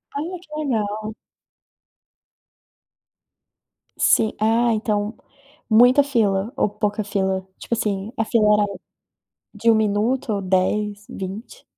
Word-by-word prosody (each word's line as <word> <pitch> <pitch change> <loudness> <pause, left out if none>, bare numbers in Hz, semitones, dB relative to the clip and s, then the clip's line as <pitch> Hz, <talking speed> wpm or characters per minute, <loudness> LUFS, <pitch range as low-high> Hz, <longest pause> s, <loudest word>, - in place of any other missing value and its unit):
Olha, 330 +6 -4
que 355 - -21
legal! 215 -5 -2 2.8
Sim 220 - +3
Ah, 230 +2 +2
então, 210 -1 -1 0.5
muita 245 +5 +6
fila 220 -6 0
ou 210 - +1
pouca 210 +1 -2
fila? 190 -2 -2
Tipo - - -5
assim, 210 -2 -2
a 225 - 0
fila 215 -2 +3
era 210 0 +3 0.9
de 230 +2 +2
1 - - +4
minuto 220 +4 0
ou 200 - -2
10, 205 +2 0
20? 200 - -8
215 Hz, 110 wpm, -22 LUFS, 205-230 Hz, 2.8 s, muita